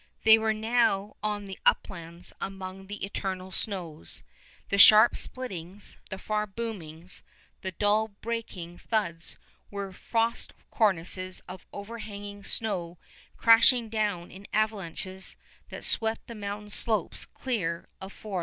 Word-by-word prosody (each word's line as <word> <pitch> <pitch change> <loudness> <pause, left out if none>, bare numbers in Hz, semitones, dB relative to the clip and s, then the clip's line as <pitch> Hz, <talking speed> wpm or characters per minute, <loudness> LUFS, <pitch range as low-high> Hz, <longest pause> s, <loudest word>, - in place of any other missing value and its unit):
They 220 0 +8
were 220 0 +2
now 215 -2 +2
on 210 -1 -1
the 195 -1 -8
Uplands 170 -2 0
among 195 0 -6
the 205 -1 -4
eternal 190 -2 -4
snows. 175 - -3 0.5
The 200 - +1
sharp 215 +3 +10
splittings, 195 -6 -3
the 190 - -4
far 210 +2 -1
boomings, 185 -6 -6 0.4
the 190 -1 -4
dull 210 +3 +3
breaking 200 -5 -5
thuds 170 -7 -2 0.3
were 200 -1 -5
frost 230 +4 0 0.2
cornices 185 -2 +1
of 185 - -9
overhanging 205 -1 -7
snow 180 -6 0 0.4
crashing 230 +1 +6
down 210 -6 -1
in 195 +2 -11
avalanches 190 -3 -1 0.3
that - - -7
swept 225 0 +2
the 235 - -8
mountain 210 -1 -5
slopes 215 -4 +1
clear 180 -10 -2
of 190 +1 -7
forests. 200 -3 -4
200 Hz, 125 wpm, -29 LUFS, 185-220 Hz, 0.5 s, sharp